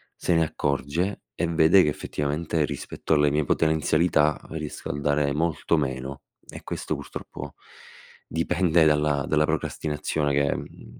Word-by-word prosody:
se 90 Hz, -, 0 dB
ne 80 Hz, -, +4 dB
accorge 75 Hz, +6 st, -2 dB
e 85 Hz, -, 0 dB
vede 85 Hz, +3 st, +5 dB
che 75 Hz, -, +2 dB
effettivamente 75 Hz, +2 st, -2 dB
rispetto 75 Hz, +2 st, -3 dB
alle 75 Hz, -1 st, +3 dB
mie 75 Hz, 0 st, +1 dB
potenzialità 80 Hz, 0 st, +2 dB
riesco 75 Hz, -2 st, -6 dB
a 70 Hz, -, -3 dB
dare 70 Hz, 0 st, +1 dB
molto 80 Hz, +1 st, 0 dB
meno. 65 Hz, 0 st, -3 dB, 0.3 s
E -, -, -10 dB
questo -, -, -4 dB
purtroppo -, -, -8 dB, 0.7 s
dipende 85 Hz, 0 st, +2 dB
dalla 75 Hz, -2 st, +2 dB
dalla 75 Hz, 0 st, +3 dB
procrastinazione 75 Hz, -1 st, -1 dB
che, 70 Hz, 0 st, +2 dB
mhmm, -, -, -10 dB
75 Hz, 135 wpm, -25 LUFS, 70-80 Hz, 0.7 s, vede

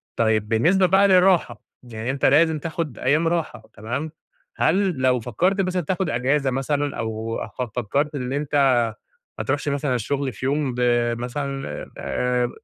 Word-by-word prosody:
طيب 110 Hz, -2 st, +1 dB
بالنسبة 170 Hz, -, +3 dB
بقى 190 Hz, +3 st, +5 dB
للراحة، 185 Hz, -2 st, +3 dB, 0.2 s
يعني 115 Hz, 0 st, -4 dB
أنت 135 Hz, -, -1 dB
لازم 160 Hz, +1 st, +4 dB
تاخد 160 Hz, -4 st, -4 dB
أيام 150 Hz, +6 st, +2 dB
راحة 165 Hz, -9 st, -2 dB
تمام، 125 Hz, +9 st, -4 dB, 0.5 s
هل 190 Hz, +3 st, +2 dB
لو 130 Hz, -1 st, +3 dB
فكرت 180 Hz, -, 0 dB
مثلًا 185 Hz, -1 st, -1 dB
تاخد 185 Hz, +2 st, -2 dB
إجازة 135 Hz, +2 st, +1 dB
مثلًا، 140 Hz, +2 st, -1 dB
أو 110 Hz, 0 st, -3 dB, 0.2 s
ف -, -, 0 dB, 0.2 s
فكرت 140 Hz, +7 st, -1 dB
إن 130 Hz, -1 st, -3 dB
أنت 145 Hz, +1 st, -2 dB, 0.8 s
ما -, -, -1 dB
تروحش 145 Hz, 0 st, -1 dB
مثلًا 140 Hz, -2 st, -1 dB
الشغل 135 Hz, +3 st, -2 dB
في 115 Hz, -, -6 dB
يوم، 140 Hz, -1 st, 0 dB
ب 125 Hz, -, -2 dB, 0.4 s
مثلًا 135 Hz, +2 st, -4 dB
آآ 125 Hz, -1 st, -1 dB
140 Hz, 150 wpm, -23 LUFS, 125-160 Hz, 0.8 s, بقى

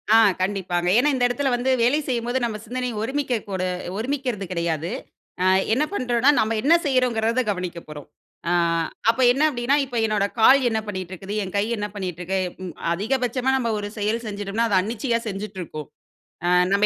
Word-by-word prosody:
ஆ -, -, +9 dB, 0.2 s
கண்டிப்பாங்க. 185 Hz, -2 st, -1 dB
ஏன்னா, 290 Hz, +4 st, +4 dB
இந்த 250 Hz, -, 0 dB
இடத்துல 270 Hz, +2 st, 0 dB
வந்து 245 Hz, +2 st, -1 dB
வேலை 270 Hz, +6 st, +3 dB
செய்யும்போது 245 Hz, 0 st, -1 dB
நம்ம 220 Hz, -2 st, -3 dB
சிந்தனை 250 Hz, +2 st, -3 dB
ஒருமிக்க 265 Hz, +2 st, -1 dB
கூட 185 Hz, -1 st, -2 dB, 0.3 s
ஒருமிக்கறது 250 Hz, -4 st, -2 dB
கிடையாது. 170 Hz, -1 st, -2 dB, 0.5 s
ஆ, -, -, +2 dB, 0.3 s
என்ன 275 Hz, -, +2 dB
பண்றோன்னா 250 Hz, -5 st, +2 dB
நம்ம 220 Hz, +1 st, +1 dB
என்ன 310 Hz, +5 st, +4 dB
செய்யிறோங்கிறத 250 Hz, -3 st, +2 dB
கவனிக்கப் 180 Hz, -4 st, -4 dB
போறோம். 150 Hz, -2 st, -9 dB, 0.4 s
ஆ, -, -, +1 dB, 0.6 s
அப்ப 230 Hz, -, +2 dB
என்ன 270 Hz, +4 st, 0 dB
அப்பிடின்னா, 245 Hz, +1 st, +1 dB
இப்ப 245 Hz, -2 st, -5 dB
என்னோட 210 Hz, -2 st, +1 dB
கால் 265 Hz, +5 st, +7 dB
என்ன 220 Hz, -1 st, 0 dB
பண்ணிட்ருக்குது? 190 Hz, 0 st, -6 dB
என் 185 Hz, -, -7 dB
கை 200 Hz, -, +3 dB
என்ன 210 Hz, 0 st, -2 dB
பண்ணிட்ருக்கு? 185 Hz, -1 st, -3 dB
அ 185 Hz, -, -12 dB
ம். 180 Hz, -, -5 dB, 0.2 s
அதிகபட்சமா 250 Hz, +6 st, 0 dB
நம்ம 240 Hz, -3 st, -1 dB
ஒரு 205 Hz, -, -4 dB
செயல் 215 Hz, +3 st, -1 dB
செஞ்சுட்டோம்னா, 205 Hz, +2 st, -2 dB
அத 200 Hz, -, +2 dB
அன்னிச்சையா 230 Hz, +4 st, -1 dB
செஞ்சுட்ருக்கும். 190 Hz, -7 st, -6 dB, 0.6 s
ஆ -, -, +1 dB, 0.2 s
நம்ம 200 Hz, +1 st, +4 dB
220 Hz, 165 wpm, -23 LUFS, 190-250 Hz, 0.6 s, ஆ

